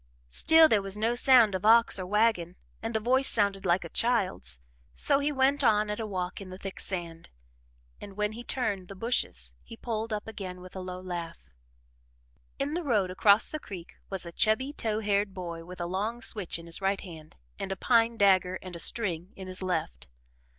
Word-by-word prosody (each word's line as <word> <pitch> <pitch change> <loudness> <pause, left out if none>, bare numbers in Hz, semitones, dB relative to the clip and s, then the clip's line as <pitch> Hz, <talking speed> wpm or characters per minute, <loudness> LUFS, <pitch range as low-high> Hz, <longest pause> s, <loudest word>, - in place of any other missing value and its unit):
Still 320 - +6
there 215 -8 +3
was 195 +1 -5
no 225 +3 +1
sound 240 -4 +5
of 185 - -3
ox 230 -1 +5
or 185 - -4
wagon 210 -4 +1 0.3
and 225 0 -4
the - - +2
voice 260 +4 +2
sounded 200 -3 0
like 175 +1 +2
a 170 - -8
child's. 195 - 0 0.4
So 280 -2 +3
he 290 +1 0
went 275 +1 +2
on 210 -3 +3
at 210 - -4
a 220 - -3
walk 185 -1 -4
in 190 - -9
the 185 - -8
thick 195 0 -7
sand, 170 -3 -5 0.7
and 200 -1 -10
when 210 0 0
he 235 +2 -8
turned 205 -8 -2
the 195 - -9
bushes 65 - -2
he 230 - -12
pulled 225 -1 -4
up 210 0 -3
again 190 -4 -7
with 185 +1 -12
a - - -4
low 185 0 -6
laugh. 175 - -7 1.1
In 280 +2 -2
the 345 - -1
road 210 - +1
across 200 +3 +4
the 310 - -4
creek 185 - -9 0.2
was 195 -2 -2
a 170 - -7
chubby, 235 +10 +1
tow 220 -5 -2
haired 200 -1 0
boy 170 -3 -6
with 180 +1 -10
a 175 - -2
long 210 +7 -3
switch 200 -7 -1
in 165 - -11
his 170 +3 -5
right 195 0 0
hand, 160 -5 -11 0.2
and 195 - -4
a - - -1
pine 230 +1 +2
dagger 185 -2 +3
and 185 -2 -8
a - - -7
string 180 -2 +2
in 190 - -8
his 185 0 -2
left. 160 - -3
200 Hz, 205 wpm, -28 LUFS, 180-225 Hz, 1.1 s, Still